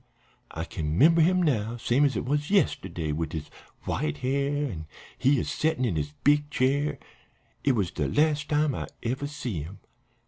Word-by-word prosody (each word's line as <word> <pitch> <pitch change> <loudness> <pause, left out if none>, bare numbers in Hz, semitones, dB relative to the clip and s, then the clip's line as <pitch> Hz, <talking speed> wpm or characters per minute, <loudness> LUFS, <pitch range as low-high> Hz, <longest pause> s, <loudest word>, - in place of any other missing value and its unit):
I 80 - -5
kin 80 -6 -3
'member 165 - +6
him 180 +2 +4
now 115 -6 0
same 125 +4 +2
as 140 - +1
it - - -2
was 145 +3 -1
yesterday, 95 - +1
wid 80 +2 -3
his 80 -2 -5 0.3
white 75 -1 -2
hair, 140 +2 0
an' 80 - -6 0.3
he 135 0 +3
a - - -1
settin' 155 -4 0
in 105 -8 0
his 75 -1 -2
big 145 +1 +3
chair. 140 +2 +1 0.7
It 140 - +3
was 100 -8 0
de 75 - -1
las' 150 - +2
time 150 -1 +1
I - - -4 0.2
ever 130 +4 -2
see 125 - -4
him. 85 +7 -8
135 Hz, 180 wpm, -27 LUFS, -, 0.7 s, member